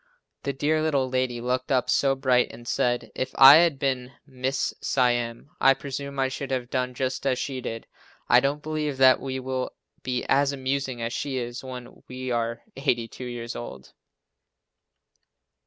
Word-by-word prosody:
The 140 - -2
dear 150 +3 0
little 140 -4 +1
lady 130 -1 -1
looked 125 +2 -2
up 130 -2 +2
so 135 -1 +2
bright 130 -2 +2
and 120 0 -12
said, 120 0 0
"If 130 - -3
I 135 +3 +10
had 165 -4 +3
been 130 -1 -2
Mrs. 130 0 -2
Siam, 120 0 0
I 135 0 +6
presume 140 0 -6
I 135 0 +2
should 135 +1 -5
have 125 -2 -3
done 125 -1 -1
just 130 0 -2
as 130 -2 +2
she 130 -1 -4
did." 115 -1 -5 0.4
I 120 - +7
don't 140 +3 -1
believe 150 -3 -2
that 130 -1 +6
we 130 -1 -4
will 130 0 -3 0.3
be 125 -1 -2
as 140 +1 +3
amusing 130 -2 -2
as 115 +1 -3
she 140 -2 -3
is 120 0 -4
when 125 -2 -9
we 130 0 -5
are 115 0 -2
82 125 -3 -2
years 120 -1 -6
old. 65 - -8
130 Hz, 170 wpm, -25 LUFS, 125-135 Hz, 0.4 s, I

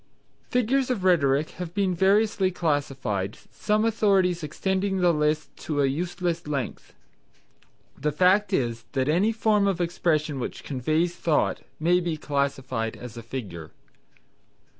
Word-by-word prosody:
Figures 250 +2 +1
of 230 -7 -1
Rhetoric 155 -5 +3
have 175 0 -6
been 195 -3 +1
variously 195 +2 +3
classified, 135 - -2
some 215 +1 0
authorities 195 -6 +2
extending 190 +5 -1
the 175 -2 +3
list 150 0 0
to 150 -2 -3
a 140 - +4
useless 170 +3 -2
length. 140 -4 -4 1.0
The 150 +2 -1
fact 185 +7 +3
is 120 -9 -1
that 130 -1 0
any 180 +8 +3
form 215 -2 +2
of 190 -3 0
expression 155 -4 0
which 125 - -5
conveys 155 +6 0
thought 155 -3 +1 0.2
may 175 +3 +3
be 170 -3 -2
classified 135 -6 -2
as 125 -2 -9
a 115 - -7
Figure. 110 -10 -7
165 Hz, 135 wpm, -25 LUFS, 140-190 Hz, 1.0 s, a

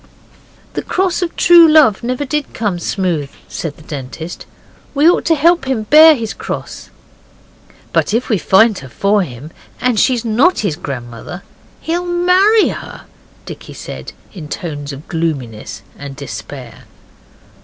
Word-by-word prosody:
'The - - -2
cross 375 -1 -1
of 345 -2 -3
true 340 -1 +7
love 295 -10 +5
never 255 +4 -2
did 295 +1 -3
come 205 -6 -1
smooth,' 170 -7 -2 0.2
said 155 -3 -5
the 155 - -15
Dentist. 150 +3 -7 0.5
'We 290 +3 +4
ought 350 - +3
to 330 - +3
help 335 0 +3
him 255 -5 -2
to - - -31
bear 310 +1 +9
his 225 -4 -4
cross.' - - -7 1.0
'But - - +1
if 235 +4 0
we 215 -5 +1
find 210 +3 +4
her 130 - -11
for 200 +8 +1
him, 145 -2 -7 0.3
and 245 -4 +1
she's 245 -3 +2
not 245 +12 +3
his 200 -8 -1
grandmother, 125 - -7 0.4
he'll 350 +2 -2
MARRY 365 +5 +4
her,' - - -8 0.4
Dicky - - -10
said - - -8 0.2
in 170 -7 -8
tones 150 -4 -5
of 140 +2 -10
gloominess 140 -10 -4
and 140 -1 -9
despair. 120 -2 -9
210 Hz, 150 wpm, -16 LUFS, -, 1.0 s, bear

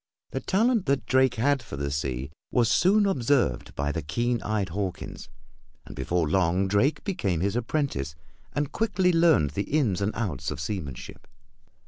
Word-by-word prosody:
The - - -2
talent 220 0 +1
that 140 0 +1
Drake 130 -1 +3
had 140 +4 +2
for 110 -11 -8
the 70 0 -2
sea 70 -1 -3 0.2
was 120 -2 +2
soon 205 +3 +4
observed 130 - +1
by 70 +1 -1
the 80 - -3
keen 120 - -1
eyed 105 -4 -1
Hawkins, 95 +1 -5 0.6
and - - -10
before 80 +4 0
long 90 +3 +2
Drake 125 +10 +1
became 100 - -1
his 100 +3 0
apprentice, 120 - -1 0.4
and 145 0 -2
quickly 190 -5 +1
learned 165 - +4
the 100 +7 -3
ins 120 - +1
and 100 +2 +1
outs 75 - -2
of 75 - -5
seamanship. 75 - -6
105 Hz, 160 wpm, -26 LUFS, -, 0.6 s, soon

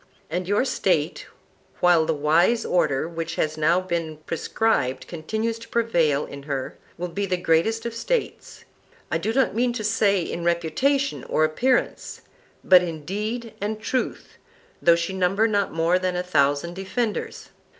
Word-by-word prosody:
And 180 +2 -2
your 205 +6 +2
State, - - 0 0.5
while 175 -3 +4
the 165 - +2
wise 165 +10 +3
order 155 -4 +1
which 165 -1 -5
has 155 0 -1
now 155 +3 +3
been 170 -4 -3
prescribed 150 - 0
continues 220 +7 -3
to 230 - -12
prevail 170 -11 +1
in 140 - -9
her, 135 -2 -3 0.2
will 180 - -3
be 200 +3 -3
the 180 -1 0
greatest 180 +7 +1
of 235 - -3
States, 455 - -3 0.5
I - - +1
do 220 - -1
not 265 +1 +2
mean 240 +2 +1
to 220 - -4
say 205 -3 +2
in 170 - -5
reputation 175 - 0
or 155 - +1
appearance, 245 +12 0 0.4
but 185 -1 +7
in 160 -4 -5
deed 220 +5 -4
and 210 +1 -2
truth, 250 +4 -3 0.4
though 170 -1 +6
she 170 +3 -2
number 190 +4 +2
not 205 -2 0
more 165 +3 +2
than 185 -1 -1
a 180 - -1
thousand 145 -1 +1
defenders. 205 +4 -3
180 Hz, 160 wpm, -24 LUFS, 165-220 Hz, 0.5 s, but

